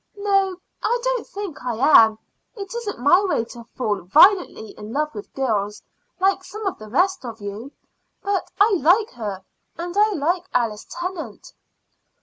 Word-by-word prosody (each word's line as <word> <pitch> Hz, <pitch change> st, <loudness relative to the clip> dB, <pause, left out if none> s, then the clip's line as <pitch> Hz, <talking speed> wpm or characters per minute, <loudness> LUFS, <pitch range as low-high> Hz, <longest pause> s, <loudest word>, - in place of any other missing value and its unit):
"No, 390 Hz, -2 st, +1 dB, 0.2 s
I 475 Hz, +3 st, +1 dB
don't -, -, -1 dB
think 395 Hz, -10 st, -7 dB
I 245 Hz, -2 st, -2 dB, 0.3 s
am. 220 Hz, -1 st, -5 dB, 0.4 s
It 395 Hz, -2 st, -7 dB
isn't 470 Hz, -4 st, -4 dB
my 290 Hz, +10 st, +4 dB
way 350 Hz, -, 0 dB
to 235 Hz, 0 st, -11 dB
fall 210 Hz, -6 st, -1 dB
violently 285 Hz, -, +4 dB
in 210 Hz, +1 st, -10 dB
love 300 Hz, +3 st, -1 dB
with 205 Hz, -1 st, -9 dB
girls, 210 Hz, -6 st, -1 dB, 0.4 s
like 385 Hz, 0 st, +2 dB
some 425 Hz, +3 st, -8 dB
of 385 Hz, -, -2 dB
the 215 Hz, 0 st, -10 dB
rest 360 Hz, -, +1 dB
of 230 Hz, -2 st, -7 dB
you. 205 Hz, +6 st, -7 dB, 0.5 s
But 400 Hz, -1 st, -1 dB
I 405 Hz, -1 st, +5 dB
like 385 Hz, +9 st, +4 dB
her; 205 Hz, -5 st, -6 dB, 0.3 s
and 345 Hz, +2 st, -5 dB
I 425 Hz, +1 st, +4 dB
like 345 Hz, +3 st, 0 dB
Alice 225 Hz, -4 st, 0 dB
Tennant." 345 Hz, -, -6 dB
335 Hz, 160 wpm, -22 LUFS, -, 0.5 s, I